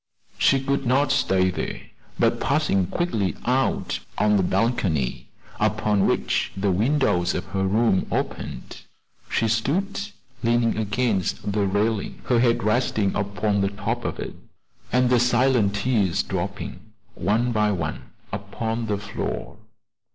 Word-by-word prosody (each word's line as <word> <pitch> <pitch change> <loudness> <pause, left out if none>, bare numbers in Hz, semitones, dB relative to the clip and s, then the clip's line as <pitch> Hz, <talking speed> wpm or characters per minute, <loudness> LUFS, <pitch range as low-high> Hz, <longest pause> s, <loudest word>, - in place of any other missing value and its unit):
She 135 - +4
could 135 -1 -1
not 135 +3 +3
stay 95 -1 +2
there, - - -4 0.4
but - - +2
passing 140 - +1
quickly 110 - -1
out 130 +2 +1 0.2
on 105 +1 +3
to 105 - +5
the - - +3
balcony 95 - 0 0.3
upon 105 -2 +2
which - - 0
the 95 0 +1
windows 100 -4 +2
of 90 - -3
her 95 -1 +1
room 105 -1 +2
opened, - - -4 0.5
she 115 - +1
stood 145 - 0 0.4
leaning 115 -1 +2
against 105 -2 -1
the 100 -1 +1
railing, 105 +1 -1
her 120 -2 +3
head 115 -3 +2
resting 110 -2 +1
upon 100 0 0
the 100 - +2
top 100 0 -3
of - - -3
it, - - -5 0.6
and 125 0 +3
the 125 - +5
silent 120 -4 +3
tears 105 -4 +1
dropping - - -4 0.3
one 110 +6 +1
by 105 -2 +2
one 80 -5 -3 0.3
upon 110 +3 -3
the 105 -1 0
floor. 105 0 -5
105 Hz, 135 wpm, -24 LUFS, 100-125 Hz, 0.6 s, to